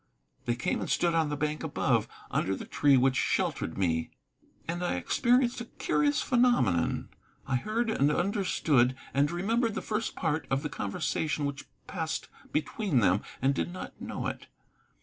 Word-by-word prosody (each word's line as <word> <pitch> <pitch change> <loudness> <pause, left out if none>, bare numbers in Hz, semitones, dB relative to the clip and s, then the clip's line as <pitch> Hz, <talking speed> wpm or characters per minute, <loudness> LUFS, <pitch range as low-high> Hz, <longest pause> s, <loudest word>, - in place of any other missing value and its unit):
They 120 - +1
came 120 - -1
and - - -4
stood 170 -1 +2
on 160 -2 +2
the 145 - -2
bank 150 +1 -1
above, - - +1 0.2
under 95 +1 +1
the - - -7
tree 140 -2 +4
which 130 +1 +3
sheltered 80 - 0
me. 80 -4 0 0.6
And 175 +1 -2
I 175 - 0
experienced 240 - +2
a - - -5
curious 150 -9 +1
phenomenon. 245 - +2 0.4
I 130 -2 +1
heard, 220 - -1
and 145 -7 +3
understood, 155 -9 +2 0.2
and 140 +2 +3
remembered 220 +6 0
the - - -2
first 220 +1 -2
part 160 -2 -1
of 135 +2 0
the 150 - -2
conversation 145 +8 -1
which 140 -1 -4 0.2
passed 160 -4 -3 0.2
between 155 - 0
them, 95 +1 +3 0.2
and 135 +1 +4
did 175 - -2
not 185 - -8
know - - -4
it. - - -4
150 Hz, 165 wpm, -29 LUFS, 135-195 Hz, 0.6 s, tree